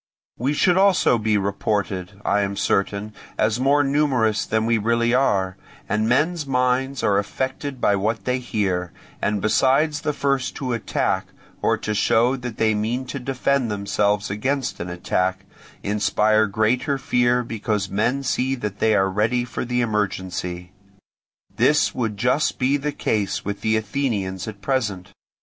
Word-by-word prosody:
We 135 +5 0
should 180 +4 +3
also 190 -11 +4
be 110 -1 +1
reported, 100 -1 -2
I 105 - +2
am 100 0 -2
certain, 100 +2 -1 0.2
as 110 +2 +1
more 140 +3 +3
numerous 135 -7 +1
than 110 0 +1
we 115 -1 +2
really 115 +2 +1
are, 95 -8 +1 0.3
and 110 +1 0
men's 150 +4 +1
minds 130 +1 0
are 100 -1 +3
affected 130 +5 -4
by 100 - +3
what 110 +3 -1
they 125 0 0
hear, 95 -7 -1 0.3
and 105 -2 0
besides 140 +7 +2
the 150 -2 0
first 140 -3 -1
to 130 -3 -3
attack, 115 - -1 0.3
or - - +2
to 105 - -3
show 115 +4 +3
that 125 -3 -6
they 110 -1 +2
mean 115 +5 -1
to 140 - -3
defend 130 0 0
themselves 105 0 0
against 130 +6 -2
an 90 - -4
attack, 95 +2 -1 0.4
inspire 105 +1 +2
greater 120 +7 +1
fear 125 -1 +2
because 105 -3 -2
men 115 +8 0
see 130 0 0
that 105 -5 -5
they 110 -1 +3
are 95 - +3
ready 110 +5 0
for 120 - -4
the 125 0 0
emergency. 95 -5 -2 0.9
This - - +3
would 110 -4 -2
just 125 +8 +1
be 130 +2 +2
the 145 +1 -1
case 105 -7 -1
with 100 0 -4
the 110 0 +2
Athenians 105 -5 -2
at 105 -2 -8
present. 105 -9 -2
110 Hz, 155 wpm, -22 LUFS, 100-130 Hz, 0.9 s, also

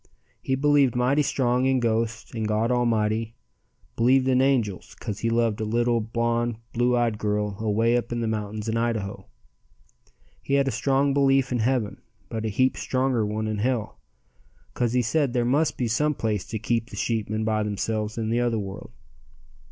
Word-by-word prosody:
He 130 - 0
believed 140 -2 +3
mighty 130 +4 +2
strong 125 -2 +1
in 130 -1 +2
ghosts 115 -1 -1
and 110 -2 -2
God 110 +3 +1
Almighty; 115 -2 0 0.6
believed 130 +3 +3
in 130 -1 +3
angels, 120 -8 0
'cause 105 -1 -6
he 115 - 0
loved 115 -1 +1
a - - 0
little, 120 +2 +1
blonde, 115 +1 -1 0.2
blue 120 +1 +2
eyed 115 -3 0
girl 105 -1 -1
away 115 +2 +2
up 120 -1 -1
in 120 - -1
the 115 - -1
mountains 105 0 -3
in 115 0 0
Idaho. 115 -4 -2 1.1
He 140 - 0
had 140 -1 +2
a - - +1
strong 135 +4 +1
belief 135 -1 +3
in 125 - 0
heaven, 115 -2 0 0.3
but 110 -1 -4
a - - 0
heap 130 +5 +1
stronger 130 -3 0
one 105 +1 -2
in 110 -1 -2
hell, 120 0 -1 0.7
'cause 120 -1 0
he 125 -1 +2
said 140 +2 +1
there 120 -2 +1
must 145 +5 +1
be 125 - 0
some 150 +7 +1
place 105 -6 -2
to 110 - -3
keep 115 +2 -1
the - - -9
sheepmen 110 -1 -1
by 110 -1 +1
themselves 105 +1 -2
in 110 -1 -2
the 120 - +2
other 120 -2 +1
world. 100 0 -6
115 Hz, 185 wpm, -25 LUFS, 110-125 Hz, 1.1 s, believed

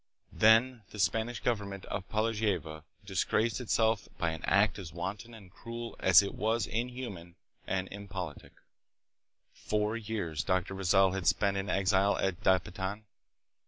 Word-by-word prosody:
Then 115 +3 +4
the - - -11
Spanish 110 +3 0
government 100 -5 -2
of 95 0 -5
Po 110 0 +1
lavieja 100 -9 -1 0.2
disgraced 110 +5 0
itself 110 -2 +1
by 85 -1 0
an 80 - -6
act 100 +3 +3
as 85 -5 -8
wanton 100 +7 -5
and 100 -5 -14
cruel 115 +3 -7
Aguinaido. - - -3
as 95 0 +9
it 100 - -4
was 110 0 0
inhuman 115 -8 -5 0.3
and 95 -1 -1
impolitic. 95 -6 -7 1.0
Four 105 +1 -1
years 100 -8 -3
Dr. 95 +1 0
Rizal 95 0 +3
had 95 -2 -3
spent 100 -1 +2
in 95 0 -2
exile 100 +1 +2
at 95 -2 -1
Dapitan. 95 +2 0
100 Hz, 145 wpm, -31 LUFS, 95-110 Hz, 1.0 s, as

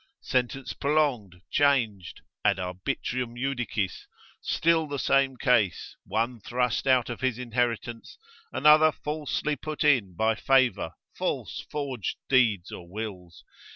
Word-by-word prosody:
Sentence 130 0 -1
prolonged, 135 -12 0
changed, 120 -11 +1 0.2
ad - - +3
arbitrium 115 +6 -3
judicis, 120 -7 -2 0.3
still 165 -1 +2
the 145 -1 -4
same 135 -1 +2
case, 120 - +1
one 115 +5 -1
thrust 125 +4 -1
out 130 -3 +4
of 120 - -7
his 130 -3 0
inheritance, 120 -1 -2 0.3
another 155 +1 +6
falsely 150 0 -2
put 155 +3 -4
in 120 - +3
by 110 +4 +2
favour, 130 -7 +2 0.2
false - - -3
forged 135 -7 -3
deeds 110 -9 +3
or 85 -1 -9
wills. 95 -4 -7
125 Hz, 120 wpm, -27 LUFS, 110-140 Hz, 0.3 s, another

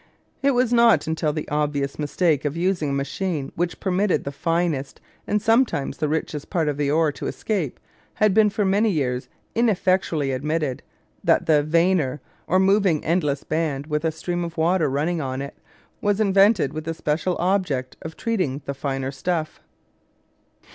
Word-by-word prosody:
It 275 -1 +2
was 245 -1 +2
not 235 -1 +5
until 160 -1 0
the 155 0 -4
obvious 145 -2 -1
mistake 150 0 +1
of 145 +2 -2
using 175 -4 0
a - - -1
machine 140 +2 -2
which 175 +1 -2
permitted 190 0 +1
the 140 - -4
finest, 165 -2 -1 0.3
and 210 - +1
sometimes 225 - +1
the 155 - 0
richest, 150 -1 -3
parts 160 -5 +1
of 145 - -7
the 145 -1 0
ore 155 +1 +3
to - - -6
escape 185 - -3 0.4
had 215 -2 +3
been 215 0 +5
for 205 0 -1
many 205 +3 +3
years 130 -8 -1 0.2
ineffectually 185 - +1
admitted, 150 0 -2 0.4
that - - +3
the 155 -2 +4
"vanner," 160 -2 +1 0.3
or 185 - +3
moving 190 -4 +3
endless 150 -5 0
band 155 -3 -2
with 150 0 -2
a 160 - +1
stream 175 +2 -3
of 170 0 -6
water 165 -1 +2
running 155 +5 -1
on 130 -1 -3
it, 140 0 -5 0.5
was 205 0 +1
invented 195 - +4
with 155 0 -5
the 165 0 -3
special 160 +4 -1
object 175 -9 0
of 160 0 -8
treating 180 - -1
the 140 - -3
finer 135 -1 -3
stuff. 155 +3 -3
160 Hz, 170 wpm, -23 LUFS, 145-190 Hz, 0.5 s, not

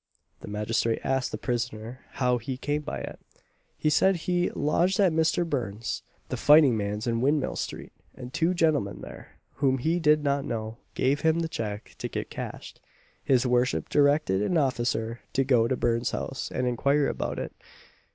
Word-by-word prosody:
The - - -10
magistrate 110 +2 0
asked 135 -1 0
the - - -3
prisoner 120 -1 -3
how 125 -2 +1
he 125 +3 -5
came 145 +3 -1
by - - -5
it. - - -7 0.6
He 155 - +1
said 190 +5 +4
he 175 +1 0
lodged 175 +6 +1
at 190 -5 +4
Mister 160 +2 +2
Burn's, 115 -8 -3 0.3
the - - -2
fighting 145 -4 +6
man's, 105 0 -2
in 115 -1 0
Windmill 145 +2 +1
street, - - -5 0.2
and 125 0 -9
two 165 +3 +1
gentlemen 155 - +1
there, - - -11 0.2
whom 135 -2 +2
he 160 +7 0
did 150 -2 +4
not 140 -1 +1
know, 110 -2 -4 0.2
gave 135 +3 +1
him 160 +1 +2
the 165 - -1
cheque 105 -8 -5
to - - -2
get - - -5
cashed. - - -7 0.4
His 130 -1 +3
worship 125 +1 +1
directed 145 -8 +3
an 170 +11 +1
officer 120 -4 0
to 135 - +2
go 125 -4 +3
to 130 - 0
Burn's 120 +1 +1
house 135 - -4
and 125 - -1
inquire 140 +4 +2
about - - -3
it. - - -5
130 Hz, 175 wpm, -27 LUFS, 115-150 Hz, 0.6 s, fighting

